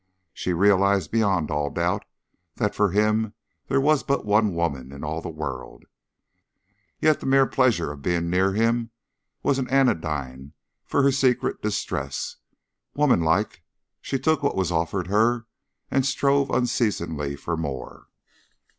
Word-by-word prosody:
She 90 Hz, -, -3 dB
realized 100 Hz, -1 st, +3 dB
beyond 100 Hz, -9 st, +1 dB
all 75 Hz, -1 st, 0 dB
doubt -, -, -1 dB, 0.5 s
that 105 Hz, -, -1 dB
for 105 Hz, -1 st, +2 dB
him 105 Hz, +2 st, +1 dB, 0.3 s
there 135 Hz, 0 st, +2 dB
was 150 Hz, +1 st, +3 dB
but 140 Hz, -4 st, -1 dB
one 105 Hz, -2 st, +2 dB
woman 70 Hz, -6 st, -2 dB
in 70 Hz, +2 st, -9 dB
all 80 Hz, +2 st, -3 dB
the -, -, -6 dB
world, 70 Hz, -5 st, -6 dB, 1.2 s
yet 155 Hz, -1 st, +3 dB
the -, -, -6 dB
mere 135 Hz, 0 st, +5 dB
pleasure 120 Hz, -, +1 dB
of 75 Hz, -1 st, -10 dB
being 85 Hz, +1 st, 0 dB
near 95 Hz, +2 st, +2 dB
him 115 Hz, +2 st, +1 dB, 0.5 s
was 135 Hz, -, +2 dB
an 130 Hz, -, -3 dB
anodyne 75 Hz, -, 0 dB, 0.3 s
for 140 Hz, -, +2 dB
her 140 Hz, -, +5 dB
secret 130 Hz, -2 st, +1 dB
distress. 105 Hz, -1 st, -3 dB, 0.6 s
Womanlike, 100 Hz, -, +2 dB, 0.4 s
she 135 Hz, -, -2 dB
took 155 Hz, +3 st, +1 dB
what 140 Hz, -, 0 dB
was 95 Hz, -2 st, 0 dB
offered 85 Hz, +2 st, -1 dB
her 110 Hz, +4 st, +2 dB, 0.5 s
and 135 Hz, -, +2 dB
strove 140 Hz, +1 st, +2 dB
unceasingly 85 Hz, -, -1 dB
for 85 Hz, +4 st, -3 dB
more. 70 Hz, -6 st, -6 dB
100 Hz, 140 wpm, -24 LUFS, 80-125 Hz, 1.2 s, mere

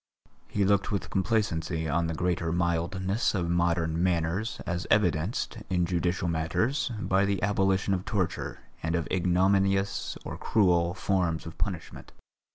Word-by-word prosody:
He 100 Hz, -1 st, 0 dB
looked 100 Hz, +1 st, +2 dB
with 100 Hz, -, -2 dB
complacency 90 Hz, -5 st, 0 dB
on 80 Hz, +3 st, +1 dB
the 80 Hz, -, -3 dB
greater 90 Hz, -1 st, 0 dB
mildness 90 Hz, +5 st, 0 dB
of 85 Hz, -3 st, 0 dB
modern 85 Hz, -1 st, +1 dB
manners 90 Hz, +4 st, 0 dB
as 85 Hz, +1 st, -3 dB
evidenced, 100 Hz, +3 st, +1 dB
in 90 Hz, -2 st, +2 dB
judicial 90 Hz, 0 st, 0 dB
matters, 110 Hz, -, 0 dB
by 95 Hz, -2 st, +2 dB
the 100 Hz, -1 st, +1 dB
abolition 95 Hz, -1 st, +2 dB
of 90 Hz, -1 st, -1 dB
torture 95 Hz, -7 st, -2 dB, 0.2 s
and 80 Hz, +1 st, -1 dB
of 85 Hz, -1 st, -1 dB
ignominious 95 Hz, +2 st, +1 dB
or -, -, -6 dB
cruel 90 Hz, -5 st, +2 dB
forms 90 Hz, -4 st, 0 dB
of 80 Hz, -, -8 dB
punishment. 90 Hz, -6 st, -5 dB
90 Hz, 140 wpm, -28 LUFS, 85-100 Hz, 0.2 s, looked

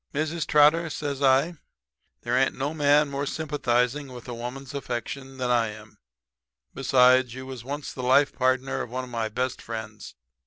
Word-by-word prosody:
"'Mrs. 155 Hz, +2 st, -1 dB
Trotter,' 155 Hz, +3 st, +5 dB
says 145 Hz, -2 st, -4 dB
I, 140 Hz, +5 st, +3 dB, 0.7 s
'there's 125 Hz, +2 st, +2 dB
no 140 Hz, +4 st, -3 dB
man 150 Hz, -1 st, +4 dB
more 140 Hz, 0 st, -3 dB
sympathizing 140 Hz, -3 st, 0 dB
with 125 Hz, -1 st, -10 dB
a 125 Hz, -, -5 dB
woman's 125 Hz, +3 st, -7 dB
affections 135 Hz, 0 st, -5 dB
than 125 Hz, -1 st, -1 dB
I 120 Hz, -2 st, +3 dB
am. 105 Hz, -1 st, -11 dB, 0.7 s
Besides, 130 Hz, -2 st, +4 dB
you 130 Hz, 0 st, -7 dB
was 130 Hz, -3 st, -8 dB
once 140 Hz, +3 st, -5 dB
the 130 Hz, -, -6 dB
life 130 Hz, +3 st, +4 dB
partner 130 Hz, 0 st, 0 dB
of -, -, -5 dB
one 130 Hz, +2 st, -4 dB
of 125 Hz, -, -10 dB
my 115 Hz, -2 st, -2 dB
best 125 Hz, +3 st, -2 dB
friends. 110 Hz, -2 st, -7 dB
130 Hz, 165 wpm, -26 LUFS, 125-145 Hz, 0.7 s, Trotter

